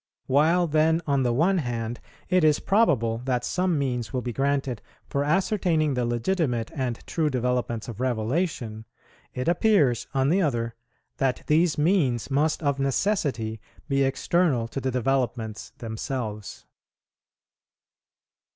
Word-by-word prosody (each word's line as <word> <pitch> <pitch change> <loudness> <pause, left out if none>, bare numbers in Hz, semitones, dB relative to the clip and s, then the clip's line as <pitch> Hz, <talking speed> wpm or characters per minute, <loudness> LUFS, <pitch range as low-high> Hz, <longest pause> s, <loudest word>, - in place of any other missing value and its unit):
While, 160 +6 +3
then, 160 +1 +2
on 140 -2 +1
the 125 -2 +1
one 175 +10 +2
hand, 120 -4 -3 0.3
it 185 -2 +3
is 155 -1 +4
probable 130 - +2
that 125 -2 0
some 180 -3 0
means 125 -4 -2
will 130 -3 -2
be 120 - -3
granted 135 -3 -1 0.3
for 140 - -1
ascertaining 165 -2 +1
the 125 -2 0
legitimate 120 -1 -1
and 130 -5 -2
true 160 -2 0
developments 125 -3 -1
of 115 -3 -7
Revelation, 120 -2 -1 0.5
it 125 - -3
appears, 170 - +3
on 135 0 +1
the 185 +5 +3
other, 120 -7 -1 0.4
that 135 -2 0
these 160 +1 +2
means 150 - +1
must 155 +4 +1
of 140 -1 0
necessity 135 - 0 0.3
be 140 -2 +1
external 135 -1 +1
to 135 - -4
the 130 - -1
developments 120 -3 -1
themselves. 110 -2 -5
135 Hz, 135 wpm, -25 LUFS, 120-160 Hz, 0.5 s, is